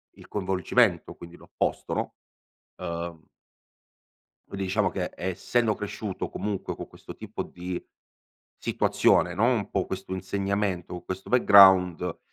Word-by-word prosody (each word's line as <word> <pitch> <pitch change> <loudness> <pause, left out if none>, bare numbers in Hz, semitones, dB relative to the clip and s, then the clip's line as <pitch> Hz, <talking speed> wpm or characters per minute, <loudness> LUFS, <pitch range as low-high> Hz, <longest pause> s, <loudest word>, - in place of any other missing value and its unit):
il - - -15
coinvolgimento, 95 0 +1
quindi 85 0 -12
l'opposto, - - -3
no, - - -3 0.6
uhm 85 -2 -5 1.2
Quindi 100 -1 -4
diciamo 95 0 +1
che 90 -2 -3
essendo 110 +5 0
cresciuto 105 -1 -5
comunque 105 -2 -4
con - - -8
questo - - -12
tipo - - -6
di 90 0 -6 0.8
situazione 90 - +2
no, 110 +5 +2
un 120 -5 +1
po' 95 - 0
questo 95 0 -6
insegnamento, 95 -2 -2
questo 95 +1 -6
background, 95 -7 +6
95 Hz, 115 wpm, -27 LUFS, 90-100 Hz, 1.2 s, background